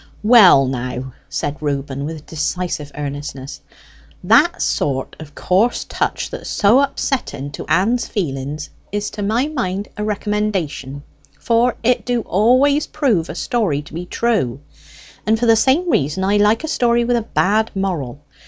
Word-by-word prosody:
"Well, 210 Hz, -, +7 dB
now," 125 Hz, 0 st, -4 dB, 0.2 s
said 145 Hz, +1 st, -3 dB
Reuben, 140 Hz, -1 st, -3 dB
with 155 Hz, -1 st, -7 dB
decisive 160 Hz, -1 st, -3 dB
earnestness, 140 Hz, -1 st, -6 dB, 0.6 s
"that -, -, +4 dB
sort 130 Hz, -, -1 dB
o' 155 Hz, -, -7 dB
coarse 205 Hz, +7 st, +1 dB
touch -, -, -3 dB
that's -, -, -7 dB
so 215 Hz, +5 st, +4 dB
upsetting 260 Hz, -, -2 dB
to 140 Hz, -, -8 dB
Ann's 230 Hz, +7 st, +1 dB
feelings 150 Hz, -, -4 dB, 0.2 s
is 205 Hz, +1 st, -3 dB
to 210 Hz, -, -6 dB
my 225 Hz, +7 st, +1 dB
mind 205 Hz, -10 st, -3 dB
a 210 Hz, -, -2 dB
recommendation; 205 Hz, -10 st, -2 dB, 0.4 s
for 235 Hz, +1 st, +2 dB
it 250 Hz, +1 st, +2 dB
do 245 Hz, -1 st, 0 dB
always 255 Hz, +9 st, +3 dB
prove 235 Hz, -, 0 dB
a 160 Hz, -, -6 dB
story 180 Hz, -11 st, -1 dB
to 150 Hz, -, -15 dB
be 175 Hz, +2 st, -6 dB
true. 185 Hz, -, -1 dB, 0.7 s
And 220 Hz, +1 st, +3 dB
for 240 Hz, -, +1 dB
the 225 Hz, -1 st, +6 dB
same 275 Hz, +10 st, +2 dB
reason, 150 Hz, -, 0 dB
I 200 Hz, +2 st, +2 dB
like 210 Hz, +6 st, +3 dB
a -, -, -3 dB
story 240 Hz, -5 st, +2 dB
with 245 Hz, 0 st, +1 dB
a 235 Hz, -, +1 dB
bad 220 Hz, 0 st, +1 dB
moral. 160 Hz, -9 st, -3 dB
195 Hz, 155 wpm, -19 LUFS, 145-235 Hz, 0.7 s, Well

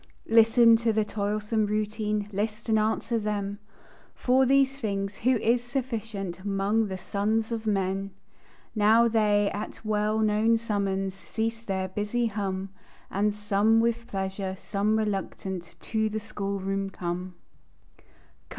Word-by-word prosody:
Listen 230 Hz, +1 st, +7 dB
to 230 Hz, 0 st, +1 dB
the 215 Hz, -1 st, +1 dB
toilsome 210 Hz, +1 st, -1 dB
routine, 210 Hz, 0 st, -1 dB
List, 215 Hz, +3 st, -3 dB
and 220 Hz, -1 st, +4 dB
answer 220 Hz, +2 st, 0 dB
them, 205 Hz, -1 st, -3 dB, 0.6 s
For 260 Hz, +1 st, +3 dB
these 275 Hz, 0 st, +4 dB
things 200 Hz, -6 st, -3 dB
who 255 Hz, +2 st, +2 dB
is 235 Hz, +2 st, +2 dB
sufficient 225 Hz, -8 st, -4 dB
'Mong 205 Hz, +2 st, +1 dB
the 190 Hz, -1 st, -4 dB
sons 215 Hz, +4 st, -1 dB
of 225 Hz, -1 st, -3 dB
men? 195 Hz, -1 st, 0 dB, 0.6 s
Now 220 Hz, +2 st, +5 dB
they, 210 Hz, -2 st, +2 dB
at 205 Hz, +2 st, -4 dB
the 220 Hz, -, -12 dB
well 215 Hz, 0 st, +1 dB
known 220 Hz, +1 st, +3 dB
summons, 195 Hz, -4 st, -1 dB
Cease 225 Hz, +3 st, -3 dB
their 190 Hz, -4 st, -2 dB
busy 210 Hz, +5 st, -1 dB
hum; 195 Hz, -3 st, -2 dB, 0.4 s
And, 205 Hz, +2 st, +1 dB
some 210 Hz, +2 st, +2 dB
with 235 Hz, 0 st, 0 dB
pleasure, 190 Hz, 0 st, -3 dB
some 205 Hz, +3 st, 0 dB
reluctant, 195 Hz, -4 st, -3 dB
To 220 Hz, -1 st, 0 dB
the 215 Hz, +1 st, -3 dB
school 200 Hz, -2 st, -4 dB
room 195 Hz, +1 st, -2 dB
come. 180 Hz, 0 st, -4 dB
210 Hz, 135 wpm, -27 LUFS, 195-225 Hz, 0.6 s, Listen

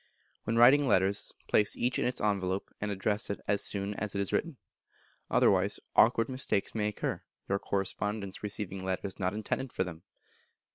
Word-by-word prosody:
When 115 Hz, -, -1 dB
writing 120 Hz, +5 st, +7 dB
several 140 Hz, -3 st, 0 dB
letters, 95 Hz, 0 st, +2 dB, 0.2 s
place 105 Hz, -, +2 dB
each 125 Hz, +1 st, 0 dB
in -, -, 0 dB
its 125 Hz, -, -1 dB
envelope, 100 Hz, -2 st, -1 dB
and 105 Hz, -, -1 dB
address 105 Hz, +1 st, -1 dB
it 100 Hz, -, -3 dB
as 100 Hz, 0 st, +3 dB
soon 100 Hz, 0 st, +1 dB
as 105 Hz, 0 st, -2 dB
it -, -, 0 dB
is 100 Hz, -, -1 dB
written. 165 Hz, -5 st, -1 dB, 0.7 s
Otherwise -, -, +3 dB, 0.2 s
awkward 115 Hz, 0 st, +5 dB
mistakes 130 Hz, -6 st, -1 dB
may 105 Hz, -2 st, 0 dB
occur, 105 Hz, -, -3 dB, 0.3 s
your 100 Hz, 0 st, 0 dB
correspondents 100 Hz, +1 st, -3 dB
receiving 100 Hz, -2 st, -3 dB
letters 95 Hz, +1 st, -3 dB
not 95 Hz, +1 st, -1 dB
intended 115 Hz, +4 st, -3 dB
for -, -, 0 dB
them. 85 Hz, -3 st, -8 dB
105 Hz, 175 wpm, -30 LUFS, 95-110 Hz, 0.7 s, writing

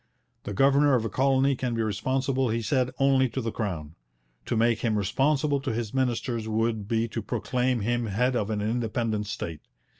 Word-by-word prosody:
The 100 Hz, -, -4 dB
governor 140 Hz, +3 st, +4 dB
of 115 Hz, -3 st, 0 dB
a -, -, -1 dB
colony 135 Hz, +1 st, +2 dB
can 125 Hz, -1 st, -2 dB
be 115 Hz, -, 0 dB
responsible, 130 Hz, +4 st, 0 dB
he 115 Hz, +1 st, -1 dB
said, 125 Hz, +3 st, +1 dB
only 135 Hz, -1 st, +3 dB
to 125 Hz, -, -4 dB
the 115 Hz, -3 st, -2 dB
Crown; 85 Hz, -10 st, -4 dB, 0.5 s
to 115 Hz, -, 0 dB
make 115 Hz, 0 st, +3 dB
him 115 Hz, -3 st, 0 dB
responsible 140 Hz, +8 st, +1 dB
to 135 Hz, -3 st, -3 dB
his 110 Hz, -2 st, -3 dB
ministers 120 Hz, -3 st, -1 dB
would 110 Hz, -1 st, -1 dB
be 115 Hz, +1 st, +1 dB
to 115 Hz, -, -4 dB
proclaim 125 Hz, +3 st, -1 dB
him 120 Hz, +2 st, 0 dB
head 125 Hz, +6 st, +1 dB
of 105 Hz, -3 st, -1 dB
an 105 Hz, -1 st, -1 dB
independent 110 Hz, -1 st, -1 dB
state. 80 Hz, -6 st, -5 dB
120 Hz, 185 wpm, -27 LUFS, 110-130 Hz, 0.5 s, governor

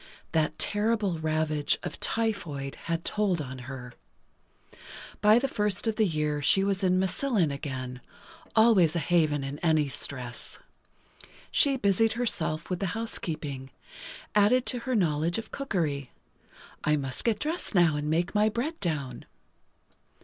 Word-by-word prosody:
That 155 Hz, -1 st, +1 dB
terrible 205 Hz, -4 st, 0 dB
ravage 155 Hz, -1 st, 0 dB
of -, -, -6 dB
typhoid 170 Hz, -12 st, -2 dB
had 165 Hz, 0 st, -2 dB
told 200 Hz, -5 st, +1 dB
on 130 Hz, -3 st, -6 dB
her. 125 Hz, -2 st, -8 dB, 1.3 s
By 210 Hz, +2 st, +6 dB
the 265 Hz, +3 st, +1 dB
first 210 Hz, -4 st, 0 dB
of 220 Hz, -1 st, 0 dB
the 215 Hz, -2 st, +4 dB
year 150 Hz, -3 st, -1 dB
she 195 Hz, +7 st, +4 dB
was 195 Hz, 0 st, 0 dB
in 185 Hz, -1 st, +3 dB
Massillon 190 Hz, -, +1 dB
again, 130 Hz, -3 st, -5 dB, 0.5 s
always 220 Hz, -8 st, +5 dB
a -, -, +2 dB
haven 155 Hz, -3 st, +2 dB
in 140 Hz, +2 st, -5 dB
any 155 Hz, -3 st, +2 dB
stress. 125 Hz, -3 st, -3 dB, 0.9 s
She 275 Hz, -2 st, +3 dB
busied 220 Hz, 0 st, +3 dB
herself 170 Hz, -9 st, -1 dB
with 180 Hz, -2 st, -2 dB
the 195 Hz, -, -1 dB
housekeeping—added 200 Hz, -, -2 dB
to 245 Hz, -, 0 dB
her 255 Hz, +1 st, -2 dB
knowledge 165 Hz, -3 st, +1 dB
of 225 Hz, -1 st, -6 dB
cookery. 160 Hz, -, -2 dB, 0.7 s
"I 150 Hz, -, +3 dB
must 135 Hz, -3 st, -2 dB
get 225 Hz, -3 st, +2 dB
dressed 315 Hz, -, -3 dB
now, 170 Hz, -4 st, +5 dB
and 150 Hz, 0 st, -2 dB
make 170 Hz, +3 st, 0 dB
my 210 Hz, +1 st, +4 dB
bread 270 Hz, +9 st, -3 dB
down." 140 Hz, -8 st, -3 dB
175 Hz, 140 wpm, -28 LUFS, 150-215 Hz, 1.3 s, By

